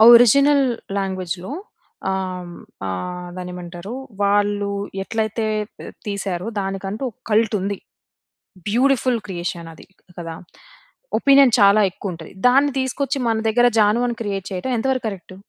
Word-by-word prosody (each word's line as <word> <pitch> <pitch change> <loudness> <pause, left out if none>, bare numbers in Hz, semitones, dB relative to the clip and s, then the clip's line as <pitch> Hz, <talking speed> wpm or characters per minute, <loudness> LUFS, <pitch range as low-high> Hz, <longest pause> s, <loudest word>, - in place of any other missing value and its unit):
Original 280 +4 +6 0.3
లాంగ్వేజ్‌లో 185 +1 -3 0.6
ఆహ్, 185 -2 -3 0.4
ఆహ్, 180 - -4
దాన్నేమంటారు? 180 +3 -7 0.3
వాళ్ళు 205 0 +2 0.3
ఎట్లైతే 220 +1 -1 0.3
త్ - - -8 0.2
తీసారో 195 -1 -3
దానికంటూ, 195 +4 -4
ఒక 225 - -39
కల్ట్ 220 0 +3
ఉంది. 200 +1 -2 0.9
బ్యూటిఫుల్ 255 +1 +2
క్రియేషన్ 175 -2 -4
అది. - - -15 0.3
కదా! 165 -1 -5 0.8
ఒపీనియన్ 275 -3 +6
చాలా 200 +1 +7
ఎక్కువ 185 0 -5
ఉంటది. 165 -1 -10 0.2
దాన్ని 275 +2 +4
తీసుకొచ్చి 275 +1 -1
మన 225 -1 +1
దగ్గర 240 +2 +4
'జాను' 215 +3 +4
అని 235 - -3
క్రియేట్ 195 -2 -3
చేయడం 185 +8 -3
ఎంత 225 - -1
వరకు 255 -3 -2
కరెక్ట్? 185 -2 -8
205 Hz, 125 wpm, -21 LUFS, 185-240 Hz, 0.9 s, చాలా